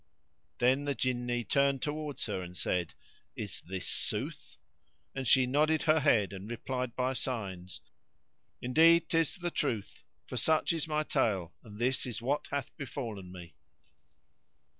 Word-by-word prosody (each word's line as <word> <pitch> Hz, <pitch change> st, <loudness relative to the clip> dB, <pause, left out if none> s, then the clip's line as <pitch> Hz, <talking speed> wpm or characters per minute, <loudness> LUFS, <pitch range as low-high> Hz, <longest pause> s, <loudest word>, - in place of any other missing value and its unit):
Then 130 Hz, +4 st, +3 dB
the 140 Hz, -1 st, 0 dB
Jinni 120 Hz, 0 st, 0 dB
turned 140 Hz, -1 st, +2 dB
towards 150 Hz, -1 st, -3 dB
her 100 Hz, -4 st, -2 dB
and 90 Hz, 0 st, -8 dB
said, 90 Hz, -2 st, -1 dB, 0.4 s
"Is 100 Hz, -7 st, -5 dB
this 95 Hz, +1 st, -5 dB
sooth?" -, -, -4 dB, 0.6 s
And 135 Hz, -2 st, -3 dB
she 130 Hz, -2 st, +6 dB
nodded 150 Hz, +4 st, +2 dB
her 160 Hz, 0 st, +4 dB
head 110 Hz, -9 st, +3 dB
and 95 Hz, +2 st, -7 dB
replied 125 Hz, +1 st, -3 dB
by 130 Hz, +1 st, 0 dB
signs, 95 Hz, -9 st, -4 dB, 0.8 s
"Indeed, 165 Hz, +6 st, +5 dB
'tis 165 Hz, -2 st, +2 dB
the 175 Hz, -1 st, -3 dB
truth: 115 Hz, -11 st, -2 dB, 0.2 s
for -, -, -5 dB
such 160 Hz, +1 st, +3 dB
is 160 Hz, -1 st, -2 dB
my 155 Hz, 0 st, +1 dB
tale 100 Hz, -, 0 dB
and 105 Hz, -2 st, -11 dB
this 130 Hz, +3 st, +1 dB
is 120 Hz, -4 st, -3 dB
what 140 Hz, +5 st, -1 dB
hath 140 Hz, -3 st, -3 dB
befallen 115 Hz, -10 st, -5 dB
me." 90 Hz, -3 st, -10 dB
125 Hz, 145 wpm, -31 LUFS, 105-145 Hz, 0.8 s, she